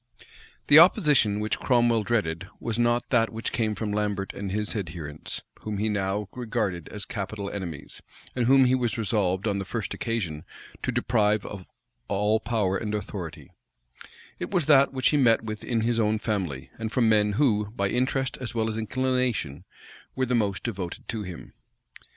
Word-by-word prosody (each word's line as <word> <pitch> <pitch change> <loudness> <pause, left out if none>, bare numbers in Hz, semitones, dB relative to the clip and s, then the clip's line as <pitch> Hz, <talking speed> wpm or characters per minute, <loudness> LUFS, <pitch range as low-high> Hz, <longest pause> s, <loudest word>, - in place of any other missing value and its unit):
The 145 - +9
opposition 150 - +5
which 105 +1 -1
Cromwell 120 -3 +3
dreaded, 95 -6 -1
was 115 0 -2
not 120 0 +1
that 115 -3 +3
which 115 +1 -4
came 110 -3 0
from 105 +1 -3
Lambert 105 -2 -1
and 100 -1 -5
his 105 +2 -1
adherents, 80 -6 -5 0.2
whom 105 -1 -4
he 110 +2 0
now 100 0 -1
regarded 110 -8 -2
as 105 - -7
capital 100 0 -4
enemies, 90 -7 -6 0.3
and 120 -2 +1
whom 135 0 +6
he 125 - +3
was 125 -2 0
resolved, 100 -3 0
on 100 -1 0
the - - -2
first 105 +2 -4
occasion, 90 -10 -3 0.4
to - - -1
deprive 105 0 +1
of 95 -3 -8 0.4
all 105 +2 +2
power 105 -5 0
and 105 +1 -3
authority; 85 -8 -6 0.9
it - - -4
was 180 -6 +1
that 140 -2 +6
which 130 -2 +2
he 150 - +2
met 115 -5 +4
with 110 -1 -6
in 115 -2 0
his 115 +1 +1
own 110 0 +2
family, 95 - -3
and 110 -1 -3
from 120 -2 +2
men 105 -1 +3
who, 105 -5 +2
by 100 -2 -1
interest 130 +4 0
as 125 -2 -6
well 110 -1 +1
as 110 - -3
inclination, 125 - -1 0.5
were 130 - +1
the 125 - -1
most 105 -5 0
devoted 95 -7 -5
to 110 -2 -3
him. 90 -4 -8
110 Hz, 175 wpm, -26 LUFS, 100-120 Hz, 0.9 s, The